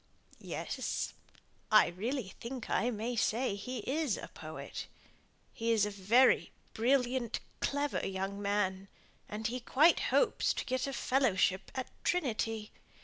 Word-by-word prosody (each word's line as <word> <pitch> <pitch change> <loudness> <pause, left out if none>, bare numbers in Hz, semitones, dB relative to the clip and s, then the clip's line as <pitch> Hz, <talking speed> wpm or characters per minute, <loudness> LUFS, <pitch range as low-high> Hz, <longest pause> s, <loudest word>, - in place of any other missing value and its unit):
"Yes. - - -3 0.6
I 215 - +8
really 215 +5 -3
think 245 0 -6
I 240 - +2
may 235 +1 -2
say 230 +1 +1
he 230 +4 -5
is 290 -4 0
a - - -7
poet. - - -7 0.7
He 230 0 0
is 215 -2 +4
a 210 - -3
very 210 +7 +4 0.2
brilliant, 250 0 +1 0.2
clever 285 +1 0
young 195 +1 -3
man, 195 -1 0 0.4
and 215 +1 -5
he 245 +2 -1
quite 295 +7 +4
hopes 460 -4 +2
to - - -3
get 260 0 -1
a 275 - -3
fellowship 235 -9 +2
at 260 -1 -2 0.2
Trinity. 225 - -1
235 Hz, 135 wpm, -33 LUFS, 205-260 Hz, 0.7 s, I